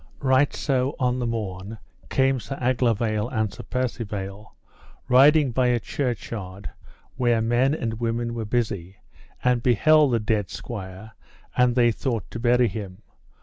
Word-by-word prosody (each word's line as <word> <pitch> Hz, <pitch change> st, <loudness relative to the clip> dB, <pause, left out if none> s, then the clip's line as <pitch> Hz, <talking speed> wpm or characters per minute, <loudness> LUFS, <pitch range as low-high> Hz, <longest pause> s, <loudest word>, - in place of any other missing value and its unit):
Right 130 Hz, +1 st, +3 dB
so 135 Hz, -1 st, -1 dB
on 125 Hz, -1 st, +1 dB
the 120 Hz, -, -1 dB
morn 105 Hz, -2 st, -4 dB, 0.3 s
came 135 Hz, 0 st, +2 dB
Sir 130 Hz, +5 st, -6 dB
Aglovale 115 Hz, -3 st, +1 dB
and 110 Hz, -5 st, -1 dB
Sir -, -, -9 dB
Percivale 105 Hz, -5 st, -4 dB, 0.5 s
riding 140 Hz, +2 st, +5 dB
by 125 Hz, +1 st, +2 dB
a 120 Hz, -1 st, +2 dB
churchyard, 105 Hz, -7 st, -4 dB, 0.5 s
where 120 Hz, -3 st, +2 dB
men 120 Hz, +5 st, +2 dB
and 115 Hz, -5 st, -4 dB
women 115 Hz, 0 st, -1 dB
were 115 Hz, -1 st, -4 dB
busy, 100 Hz, -5 st, -2 dB, 0.5 s
and 125 Hz, -1 st, +2 dB
beheld 140 Hz, +4 st, +4 dB
the 115 Hz, -, +3 dB
dead 105 Hz, -3 st, -1 dB
squire, 100 Hz, -1 st, -8 dB, 0.4 s
and 125 Hz, -1 st, +3 dB
they 120 Hz, -2 st, +4 dB
thought 115 Hz, -3 st, -3 dB
to 115 Hz, -, -5 dB
bury 120 Hz, +1 st, +3 dB
him. 100 Hz, -1 st, -7 dB
120 Hz, 145 wpm, -24 LUFS, 105-125 Hz, 0.5 s, riding